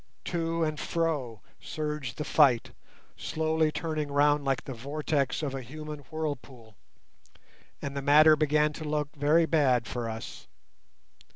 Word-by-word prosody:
To 165 -1 -1
and 155 -1 -2
fro 145 - -2 0.2
surged 150 -5 -4
the 150 - -2
fight, 140 -7 +3 0.5
slowly 160 0 0
turning 155 -3 -3
round 145 +1 +3
like 135 -2 0
the 135 - -6
vortex 140 +3 -2
of 140 -3 -2
a 135 - -4
human 150 +4 -8
whirlpool, 135 -8 -6 1.1
and 140 0 -4
the 140 - -2
matter 155 +2 +7
began 150 0 +2
to 155 - -7
look 150 0 -2
very 150 +3 +3
bad 135 -7 +2
for 115 +1 -4
us. 110 0 -8
150 Hz, 135 wpm, -28 LUFS, 135-155 Hz, 1.1 s, matter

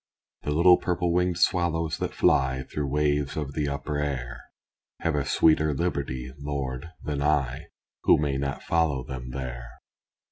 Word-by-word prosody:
The - - -4
little 90 +4 +6
purple 90 -1 0
winged 90 -1 +1
swallows 85 -2 +1
that - - -3
fly 65 0 +2
Through 75 +2 -4
waves 75 0 0
of 70 -3 -3
the 75 0 -1
upper 70 +1 -3
air, 65 -3 -3 0.6
Have 80 - 0
a 75 -1 0
sweeter 80 +1 +3
liberty, 65 -6 -2
Lord, 70 0 -4
than 75 -2 -2
I, 70 -4 0 0.4
Who - - +7
may 70 -2 0
not 70 -1 -3
follow 80 -6 +1
them 65 -1 -7
there. 60 -2 -6
75 Hz, 150 wpm, -26 LUFS, 65-80 Hz, 0.6 s, Who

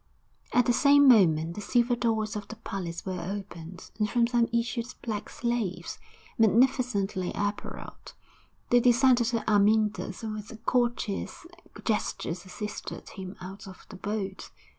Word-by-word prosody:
XII - - -1
At 245 - +4
the 245 - +3
same 285 +3 +6
moment 170 -9 +5
the 210 - -6
silver 240 +3 +2
doors 220 -3 0
of 205 -1 -5
the 220 - -8
palace 185 -6 -5
were 185 -2 -3
opened, 185 -2 -7
and 210 0 +1
from 240 +1 +3
them 235 -1 +2
issued 235 0 -1 0.2
black 210 -2 -4
slaves, 235 -6 -3 0.4
magnificently 220 -5 +2
apparelled; 205 0 -5 0.6
they 245 - +7
descended 245 0 +4
to 230 -2 -1
Amyntas 210 -1 +2
and 220 -1 -3
with 210 0 -7
courteous 240 0 -1 0.4
gestures 190 -5 -2
assisted 210 +2 -6
him 190 -1 -8
out 195 +2 -9
of 190 - -12
the - - -9
boat. 195 0 -4
215 Hz, 140 wpm, -28 LUFS, 195-240 Hz, 0.6 s, they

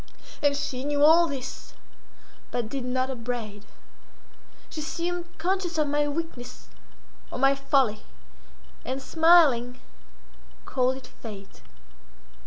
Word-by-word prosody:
And 285 -1 +3
she 260 -3 -3
knew 290 0 +1
all 335 +2 +7
this, 265 -3 -7 0.7
but 235 -3 -2
did 270 +1 -4
not 255 +1 -1
upbraid; 230 -4 -5 1.0
she 310 - -6
seemed 345 +3 -3
conscious 360 0 -1
of 300 -2 +2
my 295 0 +1
weakness 290 -5 -6 0.6
or - - -6
my 270 +2 +4
folly, 270 -5 +1 0.8
and, 260 +1 -3
smiling, 285 -6 +4 0.9
called 255 0 +1
it 265 - -11
Fate. 205 -5 -11
275 Hz, 110 wpm, -26 LUFS, 250-315 Hz, 1.0 s, all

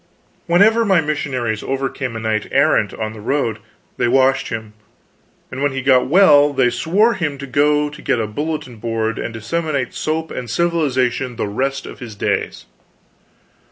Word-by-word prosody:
Whenever 210 +7 +4
my 195 -5 +3
missionaries 130 -8 -2
overcame 135 -2 -3
a - - -3
knight 110 -1 -1
errant 140 -7 +3
on 110 0 -5
the 110 - -10
road 115 -2 -1 0.4
they - - +1
washed 130 +2 +3
him, 110 -1 -6 0.8
and 130 - -5
when 145 -1 +1
he 135 - -3
got 130 -2 +4
well 145 -3 +5
they 125 -3 +2
swore 205 - +2
him 155 -8 -3
to 140 - -7
go 145 +3 +2
and 150 0 -8
get 120 - +1
a 110 - 0
bulletin 140 +1 -4
board 115 0 -2
and - - -4
disseminate 135 +4 -2
soap 160 +1 -3
and 125 -2 -6
civilization 130 -5 0
the - - -2
rest 135 +7 -2
of - - -10
his 115 -4 -8
days. - - -2
135 Hz, 165 wpm, -19 LUFS, 115-150 Hz, 0.8 s, well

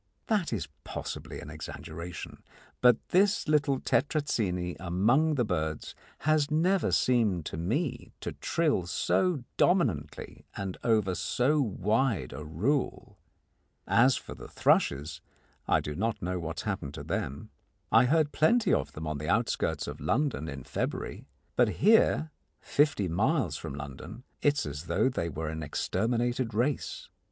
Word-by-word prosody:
That 205 -7 0
is 110 -7 -2 0.2
possibly - - -6
an - - -9
exaggeration, 85 +1 -7 0.4
but 125 -2 +4
this 200 +3 +3
little 145 -3 +2
Tetrazzini 105 - 0
among 115 - +2
the 125 -4 +1
birds 80 -5 -2 0.3
has 155 0 +2
never 180 +5 +2
seemed 110 -10 +2
to - - -5
me 115 - -2
to - - -3
trill 150 - 0
so 175 - +1
dominantly 75 - 0
and 95 -2 -3
over 110 -5 +2
so 140 +10 +1
wide 110 - 0
a 75 +4 -6
rule. 100 - -2 0.7
As 125 +2 +5
for - - -7
the - - -10
thrushes, 70 +2 +1 0.5
I - - +4
do 75 - -4
not 110 +6 -1
know 90 +1 -2
what 80 0 -4
has - - -12
happened 95 -9 -3
to - - -6
them. 70 +2 -4 0.4
I 115 +2 +6
heard 150 +2 +2
plenty 215 +7 +3
of 75 - 0
them 80 +2 -6
on 75 -2 -3
the 75 - -4
outskirts - - 0
of - - -7
London 130 - 0
in 70 -2 -7
February, - - -4 0.3
but - - +4
here, 200 -6 +4 0.3
fifty 145 -10 +1
miles 100 - +1
from 70 - -6
London, 70 - -8 0.2
it 145 -1 +3
is - - -3
as 75 +1 -5
though 130 - +2
they 85 -9 -2
were 80 0 -4
an 80 0 -4
exterminated 115 - -1
race. 130 +5 -1
110 Hz, 145 wpm, -29 LUFS, -, 0.7 s, I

